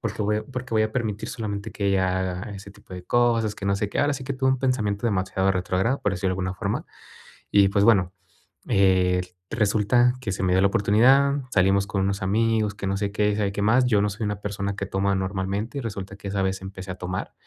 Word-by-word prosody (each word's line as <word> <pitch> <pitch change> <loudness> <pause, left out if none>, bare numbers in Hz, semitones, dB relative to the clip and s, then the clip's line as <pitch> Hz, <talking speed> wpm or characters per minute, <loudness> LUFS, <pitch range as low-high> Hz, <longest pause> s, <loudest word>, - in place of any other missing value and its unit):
¿Por 115 -4 -3
qué - - -3
voy 105 +1 0
por 125 +2 -6
qué 115 - -5
voy 110 - +4
a 110 - -4
permitir 110 -4 -3
solamente 105 -1 -5
que 100 - -2
ella 95 -1 +1
haga 95 +2 -4
ese 100 +1 -11
tipo 95 -2 -13
de 90 - -8
cosas?, 115 -1 +2
que 100 - -8
no 100 - +2
sé 100 +1 -2
qué". - - -4
Ahora 145 0 +2
sí 130 - -7
que 140 +1 -3
tuve 130 0 +1
un 130 - +1
pensamiento 120 -5 0
demasiado 95 -2 0
retrógrado, 95 +8 0
por 105 - +1
decirlo 95 0 -1
de - - 0
alguna 95 0 -3
forma. - - -3 0.7
Y, 100 -1 +5
pues, 100 +1 +2
bueno, 95 -5 +4 0.6
eh, 95 -2 +3 0.3
resulta 115 +2 +3
que 115 - -4
se 95 - -4
me 90 -1 +2
dio 95 - +4
la - - +5
oportunidad, 130 +9 +4
salimos 95 +1 +3
con 100 -2 -1
unos 100 +1 -1
amigos, 110 +1 +1
que 100 - -6
no 95 0 0
sé 100 0 -2
qué, 105 0 +1
sabe 105 -2 0
qué 100 - -3
más. 120 +5 +4
Yo 105 -5 +3
no 105 - +1
soy 110 +3 -5
una 105 -1 -3
persona 100 -1 -3
que 100 - -3
toma 100 0 0
normalmente, 95 +6 -2
y - - -2
resulta 100 -4 -6
que 100 - -8
esa 100 0 -1
vez, 95 0 -1
empecé 95 0 -8
a - - -9
tomar, 90 0 -5
100 Hz, 245 wpm, -24 LUFS, 95-110 Hz, 0.7 s, Y